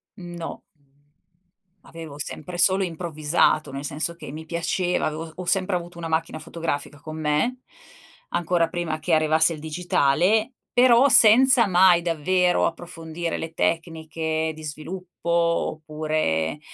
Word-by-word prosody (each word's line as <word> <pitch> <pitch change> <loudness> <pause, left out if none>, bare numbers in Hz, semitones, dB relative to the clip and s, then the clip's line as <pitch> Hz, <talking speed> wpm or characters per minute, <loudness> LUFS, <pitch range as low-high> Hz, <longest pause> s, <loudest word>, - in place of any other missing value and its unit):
No. 175 -2 -8 1.2
Avevo 165 -3 -10
sempre 165 +4 -6
solo 190 +2 +3
improvvisato, 160 -3 0
nel 135 +1 -6
senso 155 +4 -3
che 165 - -9
mi 160 +1 -8
piaceva, 175 +2 -1
avevo 160 +1 -4
ho 180 - -7
sempre 185 +1 0
avuto 175 0 -6
una 170 -1 -5
macchina 160 0 -2
fotografica 155 -3 -5
con 155 +2 -8
me, 155 +12 0 0.7
ancora 170 0 +1
prima 165 -2 -3
che 170 +2 -1
arrivasse 155 +1 +3
il 155 - -9
digitale, 175 - +1 0.2
però 250 +1 +6
senza 250 0 +6
mai 180 -1 +5
davvero 175 +2 +1
approfondire 165 0 -4
le 165 0 -6
tecniche 160 -1 -2
di 155 0 -12
sviluppo 170 +4 -7
oppure, 155 - -1
165 Hz, 125 wpm, -24 LUFS, 155-180 Hz, 1.2 s, però